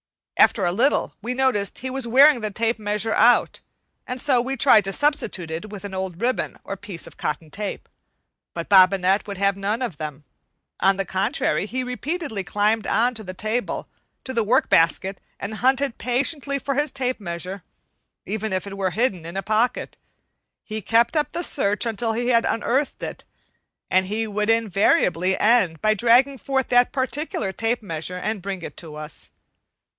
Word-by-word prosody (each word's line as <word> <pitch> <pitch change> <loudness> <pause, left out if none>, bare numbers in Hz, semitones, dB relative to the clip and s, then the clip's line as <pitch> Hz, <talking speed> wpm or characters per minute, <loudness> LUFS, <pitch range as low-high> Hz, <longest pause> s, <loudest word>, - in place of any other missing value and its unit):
After 200 -6 +4
a 175 - +2
little 245 +10 +1
we 245 +4 -3
noticed 250 -7 0
he 260 +1 -5
was 265 -2 -2
wearing 275 +3 +6
the 215 - -2
tape 225 +2 -1
measure 210 +1 -1
out, 240 +2 +4 0.5
and 250 +1 -4
so 255 -2 +3
we 265 +2 -3
tried 235 -4 +6
to 195 - -2
substitute 210 - 0
it 170 +7 -5
with 205 -1 -8
an 200 - -7
old 190 -2 -4
ribbon 245 +3 -1
or 195 - -5
piece 195 -4 -8
of - - -13
cotton 150 +1 -4
tape. 205 -1 -5 0.7
But - - -4
Bobinette 190 0 +4
would 200 -2 -6
have 200 0 +2
none 205 +5 -2
of 195 -12 -4
them. 150 -2 -6 0.6
On 195 0 +3
the 195 - -1
contrary, 200 +2 0
he 255 +3 -2
repeatedly 255 - -3
climbed 210 +3 0
on 240 +3 +2
to 220 -2 -6
the 185 -2 -8
table 220 +5 -2
and - - -8 0.4
to 260 - -4
the 230 -2 +1
work 220 +4 +2
basket, 190 +4 +2 0.2
and 220 - -5
hunted 265 +1 +1
patiently 280 +3 0
for 275 0 -2
his 290 +1 0
tape 255 -2 -2
measure, 180 +1 -5 0.6
and - - -5
even 220 -1 -3
if 185 0 -1
it 200 -1 -7
were 195 -1 0
hidden 200 -3 -1
in 170 +3 -6
a 195 - -2
pocket, 220 +3 0 0.7
he 215 0 -5
kept 230 - +2
up 300 -1 0
the 345 - -3
search 205 -8 +1
until 225 0 -1
he 240 +2 0
unearthed 235 +4 0
it; - - -6 0.7
and 185 0 +3
he 220 +3 -1
would 210 0 -2
invariably 195 -4 +2
end 205 -8 +3
by 215 +5 +3
dragging 245 +5 +3
forth 265 +2 -1
that 245 0 +4
particular 265 -5 -2
tape 225 +3 -1
measure 165 0 -4
and 210 +2 -3
bringing 190 -2 -5
it - - -9
to 160 -3 -9
us. 150 0 -7
215 Hz, 185 wpm, -23 LUFS, 195-250 Hz, 0.7 s, wearing